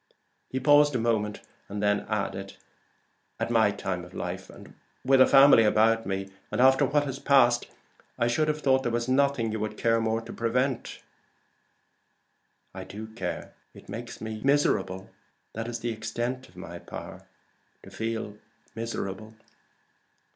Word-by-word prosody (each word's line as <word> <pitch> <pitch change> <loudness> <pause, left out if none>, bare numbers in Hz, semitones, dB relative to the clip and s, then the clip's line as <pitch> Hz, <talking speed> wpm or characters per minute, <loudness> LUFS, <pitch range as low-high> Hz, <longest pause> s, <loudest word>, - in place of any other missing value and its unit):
Jermyn 130 0 -3
paused 145 -1 +5
a - - +1
moment, 110 -2 0 0.3
and 100 +1 -5
then 105 0 +1
added, - - -3 0.8
"At - - -2
my 110 -3 +4
time 100 - -4
of - - -13
life - - -5
and - - -13 0.3
with 135 0 +5
a - - +8
family 135 -4 +7
about 110 +1 +3
me 95 0 -3 0.2
and - - -3
after 130 +1 +5
what 145 0 +2
has 135 -1 -5
passed 120 -4 +4 0.5
I 120 - +1
should 120 +6 +1
have 155 0 -1
thought 130 -2 +3
there 120 - -2
was 120 +1 -1
nothing 130 -3 +2
you 110 - -3
would 110 0 -4
care 115 -1 +2
more 110 0 0
to 115 - -9
prevent." 125 +2 -1 1.7
"I - - -7
do 110 +2 -8
care. 115 - -5 0.2
It - - -15
makes - - -7
me 110 -1 -5
miserable. 135 -9 +1 0.4
That 115 +1 -4
is 120 -1 -5
the 120 - -2
extent 120 +3 -4
of 90 - -21
my 85 -1 -8
power - - -9 0.6
to - - -13
feel 110 -2 -4 0.3
miserable." 110 -1 -5
115 Hz, 155 wpm, -27 LUFS, 110-130 Hz, 1.7 s, a